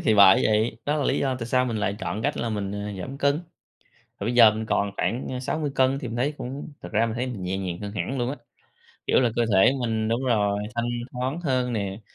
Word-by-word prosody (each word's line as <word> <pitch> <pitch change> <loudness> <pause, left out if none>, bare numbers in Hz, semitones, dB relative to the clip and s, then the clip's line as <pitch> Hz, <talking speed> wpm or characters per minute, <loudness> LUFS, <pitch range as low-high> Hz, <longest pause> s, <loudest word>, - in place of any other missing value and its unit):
thì 110 - +3
bởi 95 -2 +7
vậy. 110 +1 +1
Đó 145 +1 +1
là 145 - 0
lý 135 - +1
do 135 -2 0
tại 115 - -4
sao 125 +1 +2
mình 115 -3 -2
lại 105 -1 -1
chọn 110 -1 -3
cách 145 +3 0
là 120 - -2
mình, 100 -3 -3
ờ, 105 0 -4
giảm 135 +9 -6
cân. 140 +2 +2 0.8
Thì - - -3
bây 120 - 0
giờ 115 -3 +8
mình 110 +1 -4
còn 100 -2 +1
khoảng, 120 +3 -1
a, 125 - -3
60kg 135 -1 0
thì 135 -3 -5
mình 115 - -5
thấy 135 +5 0
cũng 135 +5 -6
thật - - -7
ra 110 +2 +3
mình 110 - -3
thấy 125 +2 -2
mình 115 -7 -5
nhẹ 95 +1 -2
nhàng 90 -3 -4
hơn 100 -1 -5
hẳn 130 +5 -3
luôn 120 0 0
á, 145 - -4 0.7
kiểu - - +4
là, 125 -2 +2
cơ 120 - +3
thể 95 +6 +6
mình, 110 -2 -1
đúng 115 +4 0
rồi, 105 -5 +2 0.2
thanh 120 0 -1 0.2
thoáng 130 +6 -2
hơn 130 -6 0
nè. 100 -2 -3
120 Hz, 255 wpm, -25 LUFS, 105-130 Hz, 0.8 s, giờ